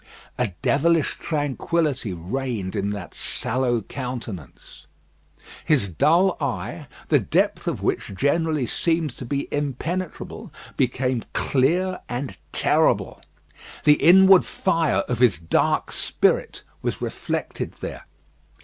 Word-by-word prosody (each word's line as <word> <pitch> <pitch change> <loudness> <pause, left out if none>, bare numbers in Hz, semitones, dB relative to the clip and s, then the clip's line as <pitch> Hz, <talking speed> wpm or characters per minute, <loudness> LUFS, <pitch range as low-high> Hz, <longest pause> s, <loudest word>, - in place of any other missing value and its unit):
A 125 - +2 0.2
devilish 160 +2 +2
tranquillity 145 - -1
reigned 100 +3 -3
in 100 0 -1
that 100 -4 -6
sallow 120 -1 -1
countenance. 120 - -7 0.8
His 130 -11 +2
dull 170 - +3
eye, 140 -3 -3 0.2
the - - +5
depth - - 0
of - - -2
which 100 - -1
generally 150 - +1
seemed 160 +1 0
to 130 - -6
be 140 +3 -2
impenetrable, 150 +5 -4 0.2
became 125 -1 0
clear 175 +8 +1
and 125 +2 -4 0.2
terrible. - - +2 0.6
The 150 0 +5
inward 190 +3 +7
fire 165 -5 +1
of 120 -2 -2
his 120 -6 +4
dark 80 0 +1
spirit - - 0 0.2
was - - -2
reflected - - -4
there. - - -7
135 Hz, 110 wpm, -23 LUFS, 120-160 Hz, 0.8 s, inward